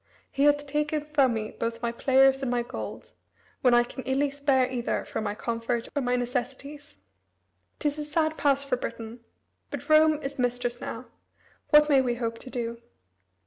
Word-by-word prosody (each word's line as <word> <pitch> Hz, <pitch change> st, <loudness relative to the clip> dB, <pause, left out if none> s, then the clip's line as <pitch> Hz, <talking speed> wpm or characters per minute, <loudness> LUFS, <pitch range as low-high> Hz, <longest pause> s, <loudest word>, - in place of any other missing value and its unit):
He 275 Hz, +1 st, +1 dB
hath 290 Hz, 0 st, +3 dB
taken 300 Hz, +1 st, -1 dB
from 280 Hz, -5 st, +2 dB
me 215 Hz, -1 st, -3 dB
both 230 Hz, 0 st, -4 dB
my 235 Hz, -, 0 dB
players 270 Hz, +2 st, +4 dB
and 265 Hz, -, -1 dB
my 240 Hz, -1 st, 0 dB
gold, 240 Hz, -, -7 dB, 0.5 s
when 250 Hz, -2 st, +5 dB
I 240 Hz, -, +6 dB
can 260 Hz, +2 st, -8 dB
illy 275 Hz, +2 st, +1 dB
spare 275 Hz, -2 st, +2 dB
either 250 Hz, -2 st, -2 dB
from 220 Hz, -, -4 dB
my 205 Hz, -1 st, -2 dB
comfort 230 Hz, +1 st, -2 dB
or 285 Hz, -, +1 dB
my 250 Hz, -1 st, +1 dB
necessities. 265 Hz, +4 st, -4 dB, 0.8 s
'T 300 Hz, -, -1 dB
is 295 Hz, +1 st, -2 dB
a 300 Hz, -, -3 dB
sad 315 Hz, +1 st, 0 dB
pass 280 Hz, -2 st, +2 dB
for 270 Hz, -3 st, -1 dB
Britain. 230 Hz, -1 st, -6 dB, 0.5 s
But -, -, -7 dB
Rome 310 Hz, 0 st, +5 dB
is 275 Hz, 0 st, -5 dB
mistress 245 Hz, -1 st, -1 dB
now. 230 Hz, +3 st, -6 dB, 0.6 s
What 300 Hz, 0 st, +7 dB
may 280 Hz, -3 st, +5 dB
we 245 Hz, -2 st, 0 dB
hope 230 Hz, -1 st, -3 dB
to 260 Hz, -, -8 dB
do?" 235 Hz, -2 st, -4 dB
260 Hz, 185 wpm, -27 LUFS, 240-290 Hz, 0.8 s, What